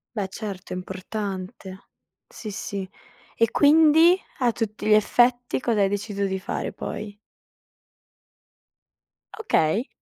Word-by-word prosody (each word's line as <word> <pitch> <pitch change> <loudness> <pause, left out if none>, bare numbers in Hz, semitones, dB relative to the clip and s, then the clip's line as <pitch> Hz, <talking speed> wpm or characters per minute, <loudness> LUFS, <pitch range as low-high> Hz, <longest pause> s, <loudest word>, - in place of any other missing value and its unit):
Beh, 200 -3 -1
certo 195 -3 -7
è - - -3
importante. 190 0 -6 0.4
Sì, 215 - -8
sì. 195 -1 -5 0.5
E 230 -1 +2
quindi, 320 +4 +6 0.2
a 245 -2 +3
tutti 215 -1 -4
gli 215 - +5
effetti 245 +4 +3
cosa 230 -4 0
hai 195 - +3
deciso 205 0 -2
di 190 -1 -2
fare - - -4
poi? 205 -1 -6 2.2
Okay. 220 - +1
210 Hz, 115 wpm, -24 LUFS, 195-240 Hz, 2.2 s, quindi